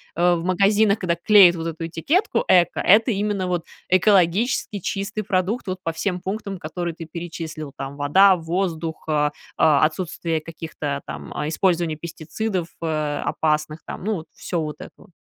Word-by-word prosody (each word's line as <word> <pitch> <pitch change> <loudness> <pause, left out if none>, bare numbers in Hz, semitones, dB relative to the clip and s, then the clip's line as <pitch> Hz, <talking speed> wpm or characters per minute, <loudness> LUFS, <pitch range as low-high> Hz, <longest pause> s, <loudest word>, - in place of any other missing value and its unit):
э, 175 +1 +3
в 165 - -4
магазинах, 200 +3 +3
когда 175 -3 0
клеят 180 0 +6
вот 165 0 -4
эту 165 0 -4
этикетку 285 - 0
"эко" 175 -2 +4
это 225 +6 +5
именно 200 -2 -1
вот 175 -2 -2 0.2
экологически 195 +3 +2
чистый 200 +3 -3
продукт 190 +4 -1
вот 185 0 -3
по 165 - -1
всем 180 +3 -2
пунктам, 200 0 -4
которые 170 +1 -4
ты 165 0 -8
перечислил, 160 -3 -7
там: 135 +1 -6
вода, 190 +7 +5
воздух, 165 -1 -3
а, 150 -1 +1 0.3
а, 150 -3 +4
отсутствие 165 -1 -2
каких-то 155 -3 -5
там, 75 -1 -8
а 150 - -2
использования 170 -1 +1
пестицидов, 170 +3 -4
э, 155 -2 -1
опасных 155 0 0
там, - - -7
ну, 215 +2 0
вот 160 -4 -6
всё 175 - -3
вот 150 -2 -5
это - - -9
вот? - - -19
170 Hz, 165 wpm, -22 LUFS, 160-195 Hz, 0.3 s, клеят